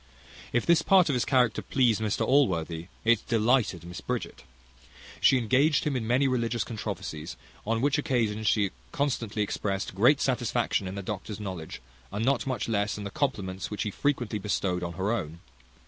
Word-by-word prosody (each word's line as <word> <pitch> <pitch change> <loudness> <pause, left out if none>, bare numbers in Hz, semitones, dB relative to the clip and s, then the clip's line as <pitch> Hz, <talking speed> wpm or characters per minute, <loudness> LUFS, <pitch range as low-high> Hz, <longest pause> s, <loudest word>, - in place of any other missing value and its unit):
If 120 - +1
this 170 -1 +5
part 185 -1 +5
of - - +2
his 125 - +1
character 125 -4 +2
pleased 120 -5 +2
Mr 105 -2 0
Allworthy, 85 - +1 0.2
it 115 -1 +4
delighted 115 -6 +2
Miss 90 +1 -8
Bridget. - - -4 0.7
She 130 - +5
engaged 130 +6 +3
him 145 -3 -1
in 115 -3 -2
many 130 +4 +3
religious 120 -3 0
controversies; 85 - -5 0.3
on 115 0 +1
which 145 +2 +2
occasions 110 -6 0
she 100 -3 +2 0.2
constantly 115 -7 -1
expressed 100 -1 -3
great 125 +9 +4
satisfaction 120 -5 0
in 95 - -5
the 100 - -5
doctor's 105 +2 -5
knowledge, 90 -10 -6 0.3
and 105 +3 -2
not 135 0 +1
much 130 -5 -2
less 105 -2 0
in 105 - -6
the 100 - -5
compliments 100 -10 -2
which 105 - -3
he 105 - -3
frequently 120 -4 -1
bestowed 95 -3 -1
on 85 -1 -4
her 95 +4 -1
own. 85 -8 -3
110 Hz, 175 wpm, -28 LUFS, 100-130 Hz, 0.7 s, this